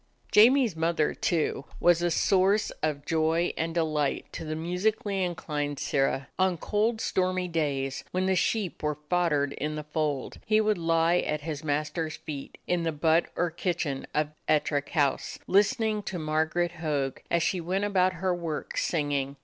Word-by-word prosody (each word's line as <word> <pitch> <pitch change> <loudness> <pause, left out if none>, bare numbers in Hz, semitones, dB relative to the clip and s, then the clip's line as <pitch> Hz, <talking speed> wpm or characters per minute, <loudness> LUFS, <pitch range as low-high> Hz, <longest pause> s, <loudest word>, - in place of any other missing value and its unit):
Jamie's 235 -1 +6
mother, 160 -1 +1
too, 155 -4 -1
was 175 -1 +4
a 175 - +2
source 195 +5 +2
of 150 -2 -2
joy 165 +1 +1
and 165 +1 -2
delight 155 -4 0
to - - -5
the 155 0 -3
musically 190 +4 -1
inclined 150 -5 -3
Sirrah. 135 -1 0
On 185 -2 +2
cold, 215 +6 0
stormy 185 -3 0
days, 140 -5 -1
when 185 +1 -1
the 190 0 +2
sheep 195 0 0
were 150 -1 -1
foddered 150 -6 +2
in 150 +1 -3
the 150 - -4
fold, 150 -3 -2
he 215 0 +3
would 215 -3 +2
lie 165 +1 +3
at 150 -3 -2
his 150 -1 -5
mas 150 0 -1
ter's 160 -1 -3
feet, 140 -3 -8
in 180 -1 0
the 165 -1 0
but 160 +2 +2
or 175 -1 0
kitchen 165 -5 -2
of 150 0 +1 0.2
Ettrick 145 -2 +1
House, 145 -4 0
listening 215 +1 +2
to 190 -3 -5
Margaret 160 +2 0
Hogg 140 -4 -1
as 170 -1 +2
she 180 +1 0
went 185 +4 -1
about 185 -2 +2
her 185 +1 -1
work 165 -3 -4
singing. 145 -4 0
165 Hz, 165 wpm, -28 LUFS, 150-185 Hz, 0.2 s, Jamie's